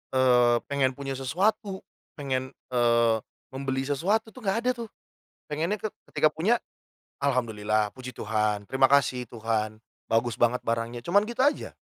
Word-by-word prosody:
eee, 125 -2 +5
pengen 140 -2 +2
punya 135 -1 -4
sesuatu, 195 - 0 0.3
pengen, 130 -3 -3 0.2
eee, 115 -2 +3 0.3
membeli 135 0 -2
sesuatu 205 +10 0
tuh - - -12
nggak 195 +2 +1
ada, 250 - +3
tuh. 225 - -9 0.6
Pengennya 165 +8 -1
ke 215 - -2 0.2
ketika - - +3
punya, 210 +10 +2 0.6
alhamdulillah, 110 -6 +1
Puji 130 -1 -7
Tuhan, 105 -1 -1
terima 135 0 +4
kasih 130 -3 +3
Tuhan, 110 -2 -2 0.3
bagus 115 +1 +2
banget 120 +1 +3
barangnya, 115 +1 -1
cuman 200 +4 +4
gitu 235 +3 -3
aja. 295 - 0
130 Hz, 140 wpm, -27 LUFS, 115-165 Hz, 0.6 s, eee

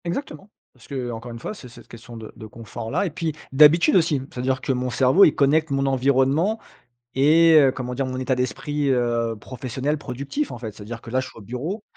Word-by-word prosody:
Exactement. 185 - -5 0.2
Parce 125 - -19
que, 140 - -7
heu, 125 -2 -3
encore 115 +2 -8
une 115 - -8
fois, 125 - -5
c'est 140 - -12
cette 120 +1 -15
question 115 0 -12
de 110 -1 -9
de 110 - -10
confort-là 115 - -4
et - - -1
puis 165 -1 -3 0.2
d'habitude 150 +7 +6
aussi. 160 -6 +2
C'est-à-dire 130 +1 -2
que - - -1
mon 125 0 -1
cerveau, 130 - +5
il 155 - +2
connecte 155 +3 +2
mon 135 0 0
environnement 135 - +2 0.6
et 160 +4 +5
heu, 135 -3 +5
comment 125 -1 -5
dire, 135 +1 -2
mon 130 0 -4
état 130 0 0
d'esprit, 140 +4 -2
heu, 120 -2 0
professionnel 130 +5 -3
productif 140 - -4
en - - -7
fait. 110 -2 -6
C'est-à-dire 110 +3 -9
que 115 - -11
là, 130 +2 +1
je 130 - -6
suis - - -15
au - - -11
bureau, 140 - -5
130 Hz, 220 wpm, -23 LUFS, 120-150 Hz, 0.6 s, d'habitude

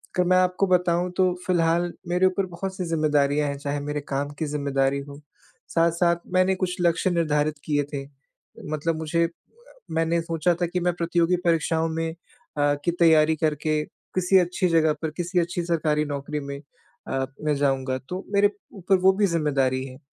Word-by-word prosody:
अगर 180 -1 +2
मैं 185 - +5
आपको 185 +1 +2
बताऊँ, 180 0 +2
तो 185 -1 +3
फिलहाल 175 -1 +2 0.2
मेरे 180 +1 +2
ऊपर 185 +1 +1
बहुत-सी 185 +1 -5
ज़िम्मेदारियाँ 150 -2 +1
हैं, 140 - -4
चाहे 145 +1 -3
मेरे 145 +1 -3
काम 140 +1 -2
की 160 - 0
ज़िम्मेदारी 140 -2 0
हो, 140 +1 -11 0.5
साथ-साथ 170 +1 +2 0.2
मैंने 185 +1 +3
कुछ 185 -1 -2
लक्ष्य 170 +1 +2
निर्धारित 155 -3 +1
किए 145 -1 +1
थे। 140 -1 -3 0.7
मतलब 160 +2 -1
मुझे 160 +1 0
अ, - - 0 0.7
मैंने 165 +1 +1
सोचा 165 +1 0
था 175 - +2
कि 180 +1 -2
मैं 175 0 +1
प्रतियोगी 170 +1 +1
परीक्षाओं 165 -1 +1
में 165 0 -1
अ, 150 -5 -3
की - - +2
तैयारी 160 -1 +5
करके 155 0 0 0.3
किसी 185 +1 +4
अच्छी 180 +1 +1
जगह 160 -2 +3
पर, 160 - -1
किसी 175 +3 -2
अच्छी 175 +1 -2
सरकारी 155 -3 +1
नौकरी 145 +1 -4
में 140 0 -6 0.5
अ, 135 0 -1 0.2
मैं 150 -1 +2
जाऊँगा। 135 -2 0
तो 185 +2 -5
मेरे 205 0 +5 0.2
ऊपर 190 0 +2
वो 190 - +8
भी 205 - +5
ज़िम्मेदारी 135 -6 0
है 130 -1 -11
165 Hz, 175 wpm, -24 LUFS, 150-180 Hz, 0.7 s, वो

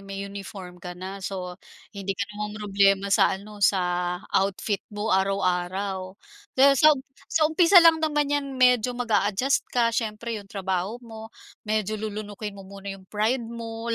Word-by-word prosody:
may 195 0 -6
uniform 195 -2 -9
ka 180 0 -8
na 190 +2 -7
so, 185 -1 -5 0.4
hindi 195 -2 -4
ka 200 - -1
na 210 0 -4
ma-mroblema 200 -1 +1
sa 190 - +4
ano, 205 +1 -12
sa, 180 -2 +1 0.2
outfit 195 +1 0
mo 210 0 -2
araw-araw. 190 0 -1 0.4
Kaya 275 +2 +7
sa 305 +2 +6
um - - -6 0.3
sa 315 - +2
umpisa 335 +4 +4
lang 325 -1 +6
naman 300 -2 +1
'yan 280 -2 -2
medyo 250 -1 +3
mag-aadjust 225 +2 +1
ka 235 -2 +1
siyempre, 225 -1 -3
'yong 200 - -16
trabaho 190 +1 -2
mo, 220 -1 -9 0.4
medyo 215 0 -1
lulunukin 210 -1 -5
mo 195 - -10
muna 200 +1 -10
'yong 195 -1 -7
pride 225 +4 +1
mo, 230 0 -5
205 Hz, 160 wpm, -25 LUFS, 195-230 Hz, 0.4 s, Kaya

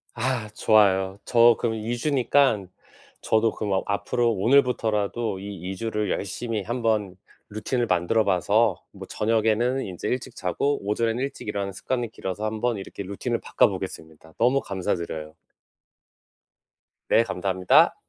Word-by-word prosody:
아 120 -2 -1
좋아요. 95 -3 +3
저 120 -1 +6
그럼 115 -2 0
2 115 +2 -3
주니깐 130 -7 +2 0.5
저도 110 +1 +2
그럼 105 -2 -2
아 95 - +2
앞으로 120 +3 0
오늘부터라도 115 -2 +1
이 95 -2 -6
2 - - -5
주를 105 -1 -2
열심히 110 +2 -3
한번 110 -4 -1 0.3
루틴을 115 +3 -2
만들어 90 +5 +2
봐서 90 -4 +2
뭐 - - -10
저녁에는 115 +4 +1
인제 90 -3 -5
일찍 125 -1 -3
자고 140 +11 -1
오전에는 115 +4 0
일찍 140 - -6
일어나는 100 -2 -3
습관이 120 +2 -3
길러서 105 +2 -5
한번 110 +2 -1
이렇게 100 +1 -8
루틴을 100 +1 -3
바꿔보겠습니다. 80 0 -2
너무 125 +4 +3
감사드려요. 85 -5 -4 1.8
네 115 - +5
감사합니다. 95 -2 +3
110 Hz, 315 characters per minute, -25 LUFS, 95-120 Hz, 1.8 s, 저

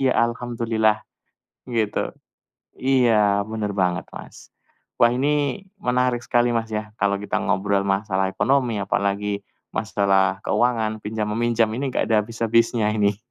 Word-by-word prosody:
ya 130 -1 +2
Alhamdulillah, 115 -2 +1 0.7
gitu. 115 -4 -1 0.6
Iya 115 -6 +3
bener 110 -2 -3
banget, 95 -1 0
Mas. - - -11 0.5
Wah 120 - +7
ini 145 +6 0 0.2
menarik 125 -1 +1
sekali, 120 0 +2
Mas, 115 -1 -1
ya, 105 0 -4
kalau 100 0 +2
kita 105 +1 -2
ngobrol 100 0 +1
masalah 95 -1 0
ekonomi, 125 +2 +1
apalagi 100 0 -1 0.3
masalah 95 -1 +1
keuangan, 110 0 +1
pinjam-meminjam 110 +2 0
ini 135 +3 -2
enggak - - 0
ada 110 -2 +4
habis-habisnya 115 -1 +1
ini 105 -2 +1
110 Hz, 120 wpm, -23 LUFS, 100-120 Hz, 0.7 s, Wah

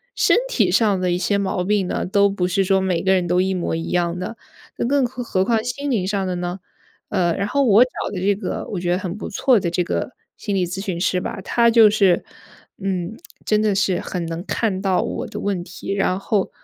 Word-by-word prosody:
身 - - +4
体 - - +2
上 210 -4 +3
的 180 -1 0
一 175 - +1
些 200 +2 0
毛 190 -2 -1
病 200 0 +1
呢， - - -2
都 200 +2 +3
不 195 -2 -1
是 195 +2 +1
说 190 0 +3
每 185 -3 0
个 190 - +3
人 185 -2 +2
都 180 +1 +2
一 190 +1 +1
模 180 -3 -2
一 165 0 -4
样 175 0 0
的， 185 +5 -5 0.4
那 - - -1
更 275 +1 +2
何 250 0 -5
何 190 -5 0
况 225 0 +1
心 280 +4 -3
灵 215 -8 0
上 195 -1 -1
的 180 - -2
呢？ 175 +1 -4 0.5
呃， 175 -4 +1
然 200 - -1
后 280 +6 +1
我 225 -2 +6
找 - - -11 0.2
的 195 - -4
这 200 +2 +2
个 205 - -4
我 195 - -3
觉 175 -1 0
得 180 - +2
很 185 -2 -4
不 - - -6
错 240 +3 +3
的 175 - -1
这 175 +1 0
个 180 - -2 0.3
心 205 -2 -3
理 185 -2 +1
咨 180 +3 -5
询 185 -4 -3
师 185 0 +1
吧， 190 - -5
他 235 +4 +3
就 225 -2 +7
是 195 -4 +3 0.5
嗯， 190 +1 -3 0.3
真 215 0 +2
的 210 -2 +1
是 190 -2 +1
很 175 -2 -4
能 165 +1 -4
看 205 -5 -1
到 190 -2 +2
我 - - -4
的 - - -7
问 200 -3 -1
题， 190 +2 -6
然 195 -2 +1
后 200 -1 0
195 Hz, 260 characters per minute, -21 LUFS, 180-210 Hz, 0.5 s, 就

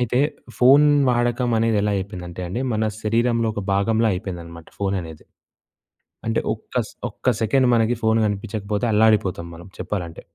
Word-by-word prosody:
అయితే, 125 0 0 0.4
ఫోను 140 +4 +6 0.2
వాడకమనేదెలా 115 -3 +1
అయిపోయిందంటే 95 -2 -6
అండి, 115 +8 -3
మన 110 0 0 0.2
శరీరంలో 115 +1 +1
ఒక 105 - -3
భాగంలా 110 +3 +2
అయిపోయిందనమాట 85 -4 -7
ఫోను 100 -1 -1
అనేది. 80 -2 -11 1.0
అంటే, 115 - +1
ఒక్క 110 - -14
స్ - - -15 0.2
ఒక్క 115 - -10
సెకెండ్ 125 +4 +3
మనకి 115 +1 +2
ఫోను 110 0 +3
గనిపిచ్చకపోతే 105 +2 -3
అల్లాడిపోతాం 105 -5 +2
మనం 85 +3 -12
చెప్పాలంటే. 85 -5 -4
110 Hz, 135 wpm, -22 LUFS, 95-115 Hz, 1.0 s, ఫోను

